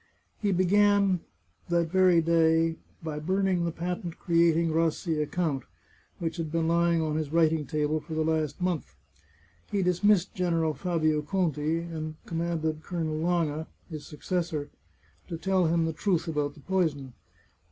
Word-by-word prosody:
He 205 -2 +1
began, 200 +1 +3 0.5
that 170 -1 +1
very 185 -2 +5
day, 165 0 +3 0.3
by 155 -2 -4
burning 185 +1 +1
the 170 - -1
patent 175 +1 -4
creating 170 -1 +3
Rassi 165 0 0
a 150 - -1
count, 155 -6 -1 0.6
which 165 0 -3
had 160 -2 -3
been 165 -1 0
lying 170 0 +2
on 155 -1 -1
his 155 -2 -3
writing 160 -3 +2
table 155 +1 0
for 160 +1 -7
the 155 - +1
last 155 -2 -1
month. 170 - -2 0.8
He 200 -2 +1
dismissed 180 +1 +3
General 165 -4 +1
Fabio 155 -3 0
Conti, 160 -2 0
and 160 -2 -5
commanded 165 -2 -2
Colonel 160 -2 -3
Lange, 160 -2 0 0.2
his 155 -2 -7
successor, 155 -2 -3 0.6
to 170 - -4
tell 185 0 +2
him 165 0 +2
the 160 - -1
truth 170 0 0
about 150 -2 -1
the 150 - -15
poison. 145 -7 -1
165 Hz, 150 wpm, -28 LUFS, 155-175 Hz, 0.8 s, very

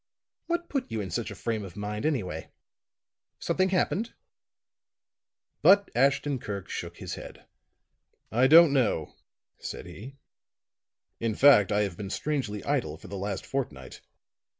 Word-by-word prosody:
"What 345 0 -1
put 270 -3 -3
you 110 - -2
into 95 -5 -5
such 115 +2 -2
a 100 - -8
frame 110 +1 -3
of 95 -2 -9
mind, 105 +5 -3
anyway? 95 - -3 0.9
Something 185 0 0
happened?" 195 +4 0 1.5
But 200 +1 +5
Ashton 135 +2 +2
Kirk 100 -4 -6
shook - - -6
his - - -6
head. - - -10 0.9
"I 125 +4 +4
don't 160 0 +8
know," 115 - +1 0.5
said - - -7
he. 130 +7 -10 1.0
"In 115 -2 -1
fact, 110 -8 +6
I 105 0 +2
have 95 -5 -2
been 100 -2 -6
strangely 130 -7 -2
idle 125 - -1
for 90 - -13
the 100 - -6
last 100 0 -4
fortnight. 120 - -5
115 Hz, 140 wpm, -28 LUFS, 100-145 Hz, 1.5 s, don't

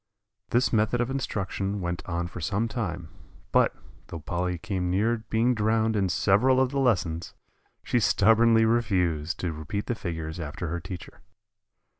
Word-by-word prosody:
This 120 +1 +2
method 110 +2 +2
of 120 +1 0
instruction 100 -6 -2
went 85 -1 -3
on 85 -1 -2
for 85 +1 -7
some 105 +7 0
time; 90 -9 -4 0.4
but, - - +3 0.3
though 80 - -7
Polly 90 +2 -2
came 90 -1 -2
near 110 +6 +2
being 115 +3 +2
drowned 110 0 +1
in 95 -3 +1
several 110 +9 +3
of 130 -1 +2
the 140 - -1
lessons, 90 -10 0 0.5
she 120 - +1
stubbornly 115 +2 +4
refused 90 -9 +1
to 85 -3 -2
repeat 80 +7 -4
the - - -1
figures 80 -5 -5
after 80 +2 -5
her 85 +2 -2
teacher. 90 0 -9
100 Hz, 155 wpm, -27 LUFS, 85-115 Hz, 0.5 s, stubbornly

